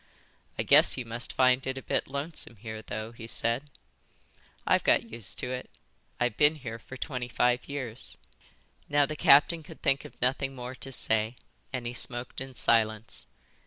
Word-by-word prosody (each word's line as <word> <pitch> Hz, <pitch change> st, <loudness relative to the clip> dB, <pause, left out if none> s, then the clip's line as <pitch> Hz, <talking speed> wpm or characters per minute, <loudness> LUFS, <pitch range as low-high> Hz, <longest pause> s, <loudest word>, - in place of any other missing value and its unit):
"I -, -, 0 dB
guess -, -, +6 dB
you 125 Hz, -, -3 dB
must 115 Hz, +1 st, -3 dB
find 130 Hz, 0 st, +3 dB
it 130 Hz, 0 st, -2 dB
a 135 Hz, -, -6 dB
bit -, -, 0 dB
lonesome 140 Hz, -3 st, -5 dB
here 110 Hz, +1 st, -7 dB
though," 110 Hz, 0 st, -5 dB
he 115 Hz, -1 st, -9 dB
said. 120 Hz, +5 st, -1 dB, 1.0 s
"I've -, -, +3 dB
got -, -, +4 dB
used 110 Hz, -1 st, 0 dB
to -, -, -1 dB
it. 130 Hz, 0 st, -5 dB, 0.5 s
I've 120 Hz, -3 st, 0 dB
been 150 Hz, +1 st, +5 dB
here 115 Hz, -6 st, -7 dB
for 130 Hz, -, -10 dB
twenty 125 Hz, +1 st, -4 dB
five 125 Hz, +2 st, +1 dB
years." 130 Hz, -5 st, -5 dB, 0.7 s
Now 145 Hz, 0 st, +4 dB
the 155 Hz, -, -5 dB
captain 150 Hz, +4 st, +6 dB
could 150 Hz, -, -13 dB
think 135 Hz, 0 st, +3 dB
of -, -, -13 dB
nothing 135 Hz, +2 st, 0 dB
more 125 Hz, 0 st, -6 dB
to 135 Hz, +1 st, -8 dB
say, 110 Hz, -2 st, +2 dB, 0.4 s
and 130 Hz, -2 st, -4 dB
he 120 Hz, -, -3 dB
smoked 120 Hz, +2 st, -1 dB
in 130 Hz, -1 st, -7 dB
silence. 110 Hz, -2 st, +1 dB
125 Hz, 175 wpm, -29 LUFS, 115-135 Hz, 1.0 s, guess